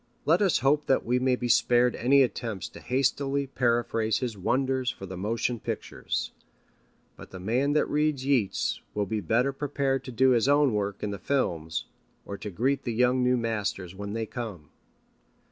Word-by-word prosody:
Let - - +3
us 190 -10 +3
hope 145 +2 +3
that 135 - +2
we 125 +2 +1
may 130 0 +2
be 125 - -3
spared 120 +1 +3
any 135 +3 +4
attempts 115 -6 -3
to - - -12
hastily 135 +2 0
paraphrase 115 -4 0
his 125 -4 -3
wonders 130 +5 0
for 95 - -6
the 95 0 -7
motion 115 +5 -1
pictures. - - -4 0.8
But - - -12
the 95 - -9
man 125 +9 +1
that 150 - +3
reads 150 -3 0
Yeats 130 -8 0
will 105 -1 0
be 110 +2 -2
better 125 +6 +1
prepared 135 -1 -1
to 130 - -6
do 130 +2 +4
his 120 0 +3
own 145 -3 +4
work 100 -1 -2
in 105 - -1
the 100 - -5
films, 85 - -1 0.4
or 100 - -5
to 105 - -5
greet 130 +8 0
the 120 - -3
young 125 +2 +2
new 125 0 +3
masters 105 -6 -2
when 100 +1 -6
they 115 0 -2
come. 105 -10 -7
120 Hz, 180 wpm, -27 LUFS, 105-135 Hz, 0.8 s, any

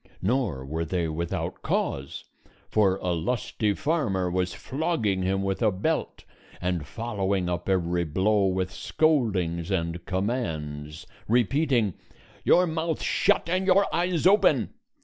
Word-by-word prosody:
Nor 100 - 0
were 80 +4 -2
they 85 0 -1
without 85 +2 -3
cause, 70 0 -2 0.5
for 100 -3 +3
a 90 - 0
lusty 105 +3 -1
farmer 105 - 0
was 90 0 0
flogging 130 - -1
him 95 +1 0
with 95 +2 -2
a 110 - +4
belt 95 +1 -2 0.4
and 90 -4 -2
following 100 -5 -2
up 90 +1 -3
every 90 -2 +1
blow 95 +5 +2
with 95 -1 -1
scoldings 100 - +1
and 85 -2 -2
commands; 80 - -3 0.2
repeating, 120 - +2 0.5
"Your 180 - +5
mouth 160 -1 -2
shut - - +2
and 185 +2 0
your 195 +1 +5
eyes 175 -1 0
open!" 200 +3 +4
95 Hz, 130 wpm, -26 LUFS, 85-125 Hz, 0.5 s, Your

